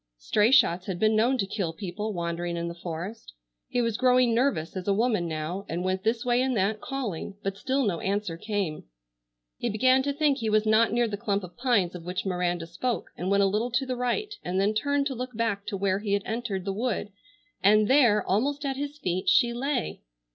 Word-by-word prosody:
Stray 210 - +2
shots 195 - +4
had 190 -3 -2
been 215 +3 +3
known 240 +5 +3
to 200 - 0
kill 190 -4 -3
people 210 +4 -4
wandering 170 -1 -3
in 170 0 -2
the 170 - -4
forest. 170 - -7 0.3
He 245 - 0
was 230 -2 -1
growing 250 -2 +4
nervous 225 - 0
as 185 0 -5
a 200 - +3
woman 215 -5 +1
now, 160 +4 -4
and 170 +2 -2
went 185 0 -1
this 230 +2 0
way 245 0 +3
and 260 -2 0
that 205 +3 0
calling, 210 -8 -4
but 195 0 -2
still 260 +6 0
no 180 -5 0
answer 200 -3 -2
came. 195 -3 -3 0.7
He 240 - -1
began 255 +5 +4
to 285 +2 -1
think 290 -1 +1
he 225 -2 -1
was 215 0 +3
not 220 +1 +4
near 240 +1 +2
the 205 -2 -4
clump 200 -1 -1
of 180 -1 -10
pines 240 -8 +1
of 180 -2 -8
which 180 +3 -4
Miranda 175 -2 -1
spoke, 235 +9 -3
and 180 - -3
went 200 0 +4
a - - +5
little 210 +5 0
to 250 +3 0
the 255 -1 -2
right 330 - -1
and 185 +1 -1
then 200 +2 +2
turned 285 +5 +1
to 275 - -1
look 250 -2 -6
back 205 -3 -1
to 205 -2 -2
where 190 0 +1
he 205 -1 -2
had 200 -1 +1
entered 220 -5 -3
the 195 - -1
wood, 215 -1 -2 0.5
and 210 +1 +5
there, 240 -6 +4
almost 280 +9 0
at 270 -1 -2
his 290 +1 -4
feet, 185 -8 -1
she 235 0 +4
lay! 255 0 -2
210 Hz, 225 wpm, -27 LUFS, 185-245 Hz, 0.7 s, a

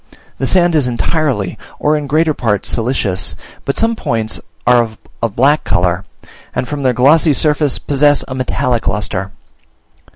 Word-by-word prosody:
The 135 - 0
sand 175 +1 +3
is 150 -5 +3
entirely, 125 - -1 0.2
or 150 +1 +2
in 150 -1 -3
greater 155 +2 +2
part, 105 -7 -1
siliceous; 115 -6 -1 0.3
but 140 - -1
some 230 0 +2
points 115 - -2 0.3
are 125 -1 +5
of 110 -2 -5 0.2
a 115 - +1
black 140 +8 +2
colour, 90 +2 0 0.5
and 125 - -1
from 145 +2 -4
their 130 -2 +3
glossy 145 +6 +4
surface 150 -1 +1
possess 145 0 +2
a 130 - -5
metallic 130 -2 -1
lustre. 95 -2 -1
130 Hz, 155 wpm, -15 LUFS, 115-150 Hz, 0.5 s, are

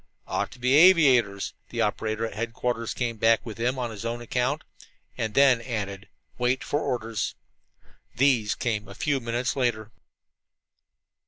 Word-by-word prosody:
"Ought - - -2
to - - -15
be 125 +2 +2
aviators," 135 - +5 0.2
the - - -2
operator 110 +1 -1
at 115 - -6
headquarters 115 +1 -2
came 115 -2 -2
back 115 +1 +4
at 115 -1 -8
him 125 +3 0
on 120 -2 -3
his 110 0 -8
own 115 +1 -3
account, 125 +5 -1 0.5
and 110 -1 -3
then 135 -4 +5
added: 100 -5 -5 0.3
"Wait 125 +1 +1
for 145 - -1
orders." 115 -6 -2 0.8
These 120 -5 +2
came 105 -3 -2
a - - -11
few 145 -3 0
minutes 120 0 -2
later. 115 -5 -1
120 Hz, 150 wpm, -26 LUFS, 110-125 Hz, 0.8 s, aviators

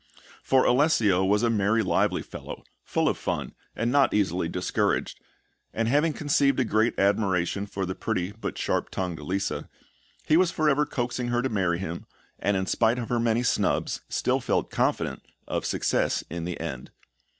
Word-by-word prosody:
For 130 -1 +3
Alessio 120 - +3
was 105 +3 +2
a 120 - +3
merry, 110 +1 +2
lively 95 - +1
fellow, - - -9 0.2
full - - 0
of - - 0
fun, - - -3 0.2
and 120 +1 0
not 140 -3 +3
easily 90 -4 +1
discouraged; 90 +1 -1 0.6
and 115 0 0
having 145 +6 +3
conceived 140 -3 +1
a 130 - +2
great 110 +1 +1
admiration 100 -1 +1
for 100 -1 -3
the 95 - -3
pretty 90 0 -2
but 110 +2 -6
sharp - - -1
tongued 90 -3 -3
Lisa, 95 +2 -3 0.6
he 155 - +4
was 180 0 +4
for 155 -2 0
ever 150 0 +3
coaxing 120 -3 -2
her 120 0 0
to 130 - 0
marry 95 -6 +1
him, 85 -2 -6 0.3
and 100 -1 +1
in 95 - -1
spite 115 +5 +2
of 120 -2 -4
her 120 - +1
many 115 +1 +1
snubs, 125 - 0
still - - +1
felt - - -1
confident - - 0 0.3
of - - -2
success - - 0
in 85 0 -4
the 90 -1 -4
end. 65 -1 -5
110 Hz, 175 wpm, -26 LUFS, 95-125 Hz, 0.6 s, he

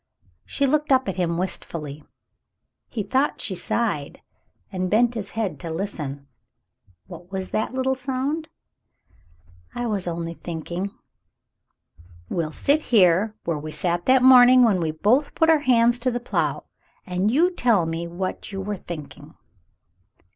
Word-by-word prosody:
She 280 - 0
looked 300 +2 +1
up 260 -3 +4
at 190 - -3
him 170 -2 0
wistfully. 155 -5 -4 0.9
He 220 -4 -3
thought 265 +7 0
she 195 - -4
sighed, 180 -4 -2 0.5
and 185 -1 -2
bent 235 +4 +3
his 205 -4 -5
head 215 -5 -2
to 170 - -6
listen. 155 -6 -5 0.8
"What 175 +2 -12
was 190 -1 -4
that 220 +4 -2
little 265 0 +1
sound? 270 +4 -3 0.7
" 85 0 -30
"I 245 - -2
was 205 -5 -2
only 170 -1 -3
thinking." 170 +3 -5 1.4
"We'll 165 -3 -2
sit 290 - +1
here 210 - +3
where 165 -3 -1
we 155 +1 -7
sat 175 +2 -2
that 260 -1 +5
morning 255 -1 +8
when 210 -6 +3
we 165 -2 -1
both 215 - +1
put 325 -1 +4
our 315 - +4
hands 240 -3 +3
to 255 +2 0
the 245 0 -2
plough, 240 - -1 0.4
and 185 +1 0
you 325 +10 +3
tell 235 - +2
me 165 +1 -3
what 185 +4 -5
you 195 - -5
were 200 +1 -3
thinking." 155 -3 -9
195 Hz, 150 wpm, -23 LUFS, 170-250 Hz, 1.4 s, morning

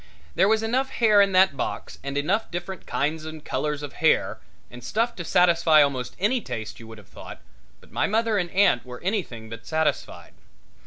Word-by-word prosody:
There 190 +3 +3
was 220 +1 +2
enough 255 +4 0
hair 215 -5 +4
in 200 -1 +3
that 185 -5 +5
box 130 - -5
and 140 0 -4
enough 190 +10 0
different 175 +2 -6
kinds 155 +2 -1
and 155 -1 -9
colors 150 -1 -2
of 145 - -7
hair - - +2 0.3
and 125 0 -11
stuff 230 - -1
to 170 - -4
satisfy 170 -3 +4
almost 130 -3 -3
any 230 +6 +1
taste, 110 - -6
you 115 - -11
would 110 0 -11
have 105 -4 -16
thought, - - -11 0.4
but - - -21
my - - 0
mother 220 0 +1
and 175 -2 -2
aunt 185 -9 +3
were 125 -1 -10
anything 175 - -3
but 115 0 -10
satisfied. 160 -1 -2
170 Hz, 195 wpm, -24 LUFS, 140-205 Hz, 0.4 s, that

